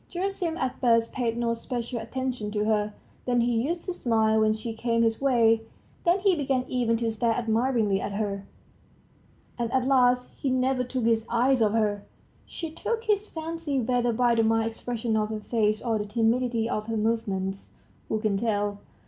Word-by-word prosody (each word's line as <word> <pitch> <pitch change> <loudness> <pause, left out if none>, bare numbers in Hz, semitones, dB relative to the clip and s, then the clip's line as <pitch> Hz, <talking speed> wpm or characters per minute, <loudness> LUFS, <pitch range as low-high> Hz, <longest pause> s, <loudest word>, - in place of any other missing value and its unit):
Gerasim 360 -2 -2
at 260 -5 -2
first 230 -2 +3
paid 235 -3 -1
no 235 -1 +1
special 235 0 -4
attention 250 -1 -3
to 210 0 -1
her, 210 -1 0 0.3
then 245 -1 +3
he 235 -1 +1
used 340 +1 -3
to 365 - -2
smile 220 -6 +2
when 215 0 +4
she 220 +1 -4
came 230 +1 +1
his 225 +1 +1
way, 230 -4 +4 0.4
then 345 +2 +4
he 385 -2 +4
began 270 -4 0
even 235 -2 +1
to 230 0 -1
stare 225 +1 +1
admiringly 225 -3 +1
at 200 - -4
her, 200 -1 -3 1.1
and 235 -1 -1
at 260 -1 +1
last 250 -2 +3
he 275 - -3
never 255 0 +1
took 250 0 -3
his 225 0 +2
eyes 250 +2 +2
off 215 -1 +3
her. 210 -2 +1 0.4
She 330 -2 -6
took 455 +7 -3
his 420 -2 0
fancy, 320 -3 -3
whether 245 0 +1
by 240 +1 +2
the 230 - +3
mild 225 0 +2
expression 230 0 -3
of 215 -1 +1
her 215 -1 -3
face 215 0 0
or 225 -3 0
the 210 - -2
timidity 230 +1 +1
of 215 -2 -3
her 225 -1 -1
movements, 200 -3 -2 0.3
who 220 - 0
can 210 -2 0
tell? 205 -2 -1
230 Hz, 185 wpm, -27 LUFS, 220-255 Hz, 1.1 s, when